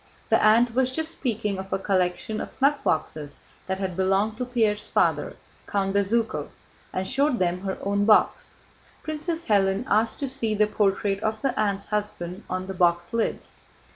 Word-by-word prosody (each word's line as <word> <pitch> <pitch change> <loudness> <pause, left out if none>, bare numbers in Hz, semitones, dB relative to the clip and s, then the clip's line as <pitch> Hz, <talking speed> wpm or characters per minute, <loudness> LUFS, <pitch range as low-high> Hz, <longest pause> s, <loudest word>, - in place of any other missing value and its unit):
The - - +3
aunt 230 +2 +5
was 260 +1 +2
just 320 +4 -2
speaking 215 -9 -2
of 190 0 -7
a - - +1
collection 195 +3 -1
of - - -5
snuffboxes 160 - -1 0.3
that 190 0 -1
had 190 -2 -3
belonged 195 +3 +1
to 250 - -1
Pierre's 220 -4 +1
father, - - +1 0.3
Count 195 -1 0
Bezúkhov, 220 +3 0 0.4
and 185 0 -2
showed 275 0 +2
them 180 -1 0
her 190 -1 -3
own 200 +1 +1
box. 215 0 +3 0.5
Princess 320 +2 -3
Hélène 195 0 +2
asked 220 0 +1
to 280 - 0
see 235 -5 -1
the 210 0 +4
portrait 200 -1 0
of 220 0 -2
the 270 - +1
aunt's 200 -2 0
husband 205 -3 -3
on 185 0 -2
the 190 - -5
box 175 +1 +1
lid. 230 -1 0
210 Hz, 170 wpm, -25 LUFS, 190-235 Hz, 0.5 s, aunt